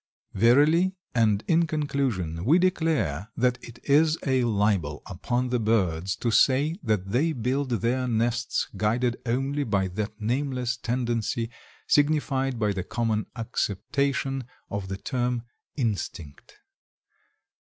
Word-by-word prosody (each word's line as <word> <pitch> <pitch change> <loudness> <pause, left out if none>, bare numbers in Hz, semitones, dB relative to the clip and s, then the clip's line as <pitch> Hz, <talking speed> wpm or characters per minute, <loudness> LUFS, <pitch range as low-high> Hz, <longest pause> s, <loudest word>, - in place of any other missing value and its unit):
Verily, 150 - +4 0.2
and 110 -3 +2
in 165 0 +3
conclusion, 130 - -1
we 145 - +5
declare 160 - +1
that 125 0 +1
it 120 0 -11
is 155 +3 +4
a 130 -2 +2
libel 100 -9 0
upon 120 +7 -2
the 125 0 +1
birds 95 -5 +1
to 120 - -1
say 140 +7 +3
that 105 -6 -1
they 155 +8 +2
build 130 +3 -1
their 120 +3 0
nests 120 +1 0
guided 115 +4 0
only 135 +4 0
by 100 -6 0
that 105 +3 -5
nameless 125 +1 -1
tendency 120 -1 -2 0.4
signified 140 -3 +2
by 105 -2 +1
the 95 - -3
common 110 +1 -1
acceptation 135 +4 -1 0.3
of 100 -2 -3
the 95 0 -4
term 125 0 -2 0.3
"instinct." 100 - -4
120 Hz, 120 wpm, -26 LUFS, 105-135 Hz, 0.4 s, we